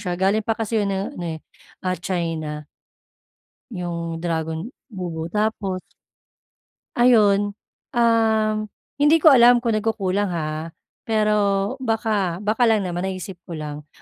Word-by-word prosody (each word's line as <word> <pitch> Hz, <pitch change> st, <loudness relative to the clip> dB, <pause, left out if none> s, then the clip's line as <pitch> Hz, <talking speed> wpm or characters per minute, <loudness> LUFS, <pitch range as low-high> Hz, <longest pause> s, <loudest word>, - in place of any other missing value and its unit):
siya, 180 Hz, -4 st, -2 dB
galing 200 Hz, +4 st, +1 dB
pa 225 Hz, -, +1 dB
kasi 225 Hz, 0 st, -1 dB
'yung 200 Hz, -, 0 dB
ano 190 Hz, -3 st, -3 dB
eh, 160 Hz, -1 st, -4 dB, 0.5 s
ah, 185 Hz, -1 st, -1 dB
China, 165 Hz, -4 st, -3 dB, 1.1 s
'yung 170 Hz, -3 st, -4 dB
dragon 160 Hz, 0 st, -2 dB, 0.2 s
bubu. 170 Hz, -5 st, -5 dB
Tapos 210 Hz, -3 st, -1 dB, 1.2 s
ayun, 205 Hz, -4 st, +4 dB, 0.4 s
uhm, 225 Hz, -2 st, +3 dB, 0.5 s
hindi 295 Hz, +3 st, +5 dB
ko 315 Hz, -, +9 dB
alam 245 Hz, -1 st, +6 dB
kung 230 Hz, -, +1 dB
nagkukulang 205 Hz, -2 st, 0 dB
ha, 155 Hz, +1 st, -4 dB, 0.3 s
pero 210 Hz, -1 st, +2 dB
baka 215 Hz, -6 st, -1 dB
baka 220 Hz, +3 st, +2 dB
lang 215 Hz, -3 st, +3 dB
naman 175 Hz, -1 st, -3 dB
naisip 185 Hz, -1 st, -6 dB
ko 170 Hz, -, -6 dB
lang 150 Hz, -1 st, -7 dB
195 Hz, 125 wpm, -22 LUFS, 170-220 Hz, 1.2 s, ko